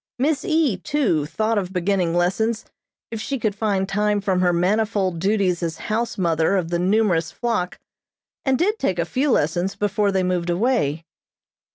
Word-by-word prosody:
Miss 280 +3 0
E., 315 - +1
too, 190 - 0
thought 215 +5 0
of 185 -2 -5
beginning 180 -2 0
lessons 215 +6 0 0.5
if 225 -1 -4
she 275 - -2
could 215 -4 -1
find 200 -2 0
time 210 +1 +1
from 190 -2 0
her 180 -1 +3
manifold 190 0 +1
duties 190 -2 +1
as 165 -2 -3
house 230 +2 -2
mother 165 0 +1
of 170 -3 -2
the 170 0 0
numerous 180 -4 +2
flock, 230 -7 -2 0.7
and 265 -1 +2
did 420 - +1
take 190 -9 0
a 170 - 0
few 260 - 0
lessons 175 - +1
before 205 0 0
they 190 -1 +1
moved 180 -1 -1
away. 175 - 0
195 Hz, 170 wpm, -22 LUFS, 175-225 Hz, 0.7 s, her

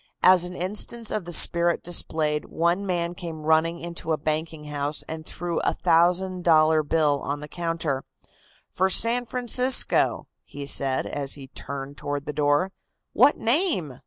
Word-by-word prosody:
As 185 -1 +6
an 180 0 -7
instance 210 +5 -2
of 210 -5 -2
the 175 - -7
spirit 170 0 +3
displayed, 155 -3 0
one 175 +4 0
man 175 -1 -1
came 165 -3 -8
running 160 +2 +2
into 170 -1 -5
a - - 0
banking 155 +1 -3
house 145 0 -2
and 160 0 -6
threw 175 -1 -3
a - - 0
thousand 180 +2 +2
dollar 155 -1 +4
bill 150 -1 +1
on 145 +1 -3
the 150 - -8
counter. 165 -5 -3 0.7
"For 190 +1 +1
San 235 +5 +2
Francisco," 250 +1 +1 0.2
he 145 0 -8
said, 135 -1 +1
as 140 -2 -2
he 135 -2 -11
turned 140 +1 -7
toward 145 0 -4
the 150 - -4
door. 145 +5 +1 0.4
"What 290 - +5
name?" 230 - 0
165 Hz, 160 wpm, -25 LUFS, 150-180 Hz, 0.7 s, As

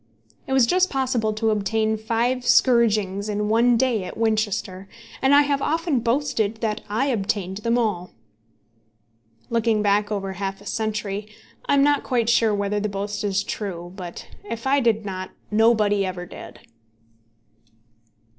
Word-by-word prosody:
It 265 - -2
was 265 -3 +5
just 365 +8 +2
possible 255 -5 0
to 220 +1 0
obtain 215 +1 0
five 235 +3 -1
scourgings 215 -5 +3
in 210 0 -1
one 235 +2 +4
day 235 -5 +1
at - - -8
Winchester, 210 -4 -1 0.3
and 270 +1 +5
I 290 - +7
have 285 -1 0
often 325 -3 0
boasted 230 -3 0
that 215 -2 -1
I 220 +6 0
obtained 195 -6 -2
them 230 +3 0
all. 205 -7 -1 1.4
Looking 225 -2 +1
back 205 +1 +2
over 195 -2 -3
half 195 +1 -4
a 205 - -16
century, 210 -1 -3 0.4
I - - +3
am 275 - +4
not 290 0 +3
quite 235 -3 0
sure 230 -2 +3
whether 205 +1 -1
the 210 +1 -2
boast 205 +1 -4
is 200 -1 0
true; 175 -4 -5
but 180 -3 -8 0.2
if 230 +1 -5
I 275 +1 +3
did 225 -4 +1
not, 185 -1 -5 0.2
nobody 210 -2 +3
ever 185 -2 -4
did. - - -11
215 Hz, 155 wpm, -23 LUFS, 200-235 Hz, 1.4 s, I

